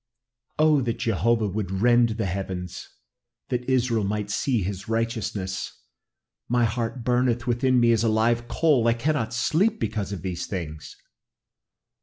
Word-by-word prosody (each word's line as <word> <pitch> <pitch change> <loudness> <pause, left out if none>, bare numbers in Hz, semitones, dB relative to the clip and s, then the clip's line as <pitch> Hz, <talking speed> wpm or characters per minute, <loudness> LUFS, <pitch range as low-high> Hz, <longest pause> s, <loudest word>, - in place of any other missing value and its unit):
"Oh, 155 -2 +4
that 120 -1 -2
Jehovah 115 0 +1
would 100 -1 -3
rend 120 +5 +3
the 110 - -1
heavens; 95 -1 -5 0.6
that 125 0 -2
Israel 120 -4 +2
might 105 +1 -2
see 120 -2 0
his 95 +1 -5
righteousness! 110 -4 -3 0.7
My 120 0 +3
heart 115 +2 -3
burneth 120 0 +1
within 125 +1 +2
me 120 -1 +4
as 115 -1 +2
a 115 - +3
live 115 +2 +1
coal. 140 -5 +2
I 115 - +4
cannot 120 -2 -1
sleep 170 - +1
because 100 -3 -2
of 95 -3 -6
these 90 -2 -4
things." 80 -5 -6
115 Hz, 145 wpm, -25 LUFS, 100-120 Hz, 0.7 s, Oh